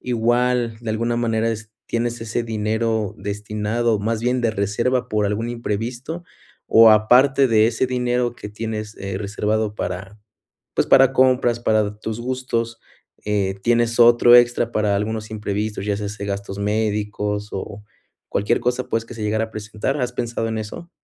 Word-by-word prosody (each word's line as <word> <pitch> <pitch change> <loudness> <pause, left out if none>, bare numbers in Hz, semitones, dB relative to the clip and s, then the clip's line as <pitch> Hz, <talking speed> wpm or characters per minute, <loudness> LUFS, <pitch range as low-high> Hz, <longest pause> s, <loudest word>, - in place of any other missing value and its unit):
igual 120 -1 +1
de 115 -2 -4
alguna 115 +2 -1
manera 115 -1 0
es 110 -1 -6 0.2
tienes 120 0 -2
ese 115 +1 -2
dinero 110 -1 -1
destinado, 105 +3 -1
más 110 +2 -1
bien 125 +1 0
de 115 - +1
reserva 115 +5 -1
por 105 -2 0
algún 110 +3 -2
imprevisto, 120 +8 -4 0.4
o 115 0 +7
aparte 130 +5 +5
de 110 -1 +4
ese 120 +3 0
dinero 125 -1 0
que 105 - -8
tienes, 110 0 -5
eh, 95 -1 -4
reservado 105 +1 -1
para 95 +3 -5 0.6
pues, - - +1
para 135 0 +6
compras 130 -2 +3
para 110 -2 +1
tus 110 +1 -5
gustos, 120 -2 -2 0.5
eh, 100 -2 0
¿tienes 120 0 +2
otro 120 +1 +7
extra 120 -1 +3
para 105 -1 +1
algunos 110 +1 -2
imprevistos, 105 -1 -3
ya 100 -1 0
sea 105 -1 -4
se 100 -1 -6
gastos 100 0 -4
médicos 105 0 -1
o 100 +2 -6 0.5
cualquier 105 +4 0
cosa, 125 +1 -1
pues, 115 0 -1
que 120 - -10
se 110 - -7
llegara 110 +1 0
a 110 - -11
presentar? 110 +6 -3
¿Has 125 -1 -1
pensado 120 -1 -2
en 110 0 -2
eso? 140 - -7
110 Hz, 165 wpm, -21 LUFS, 105-120 Hz, 0.6 s, o